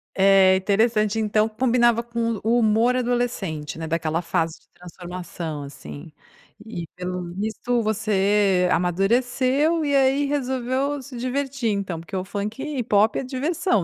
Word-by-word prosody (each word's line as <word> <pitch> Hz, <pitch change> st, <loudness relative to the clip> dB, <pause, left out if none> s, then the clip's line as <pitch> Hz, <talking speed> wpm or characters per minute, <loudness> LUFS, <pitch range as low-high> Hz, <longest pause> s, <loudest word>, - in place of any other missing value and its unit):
É 190 Hz, -1 st, +5 dB
interessante, 215 Hz, +2 st, +1 dB
então 215 Hz, 0 st, +2 dB
combinava 235 Hz, 0 st, +2 dB
com 235 Hz, -1 st, -2 dB
o 210 Hz, -, -6 dB
o 230 Hz, +3 st, +3 dB
humor 230 Hz, +3 st, +3 dB
adolescente, 235 Hz, -, -2 dB
né, 160 Hz, -, -4 dB
daquela 165 Hz, 0 st, -1 dB
fase 165 Hz, -2 st, -1 dB
de 165 Hz, -, -32 dB
transformação, 175 Hz, -3 st, -7 dB
assim, 140 Hz, +3 st, -10 dB, 0.5 s
e 175 Hz, -7 st, -6 dB
pelo 180 Hz, -1 st, -5 dB
visto 220 Hz, +4 st, -1 dB
você 205 Hz, -3 st, +2 dB
amadureceu 245 Hz, -, +1 dB
e 285 Hz, -1 st, +1 dB
aí 275 Hz, +1 st, +3 dB
resolveu 265 Hz, 0 st, -1 dB
se 260 Hz, 0 st, -11 dB
divertir 260 Hz, 0 st, -2 dB
então, 195 Hz, -4 st, -3 dB
porque 165 Hz, +3 st, -8 dB
o 185 Hz, 0 st, -2 dB
funk 205 Hz, +5 st, -4 dB
e 290 Hz, -5 st, -3 dB
pop 210 Hz, 0 st, +3 dB
é -, -, -2 dB
diversão, 275 Hz, -, 0 dB
215 Hz, 145 wpm, -23 LUFS, 185-250 Hz, 0.5 s, É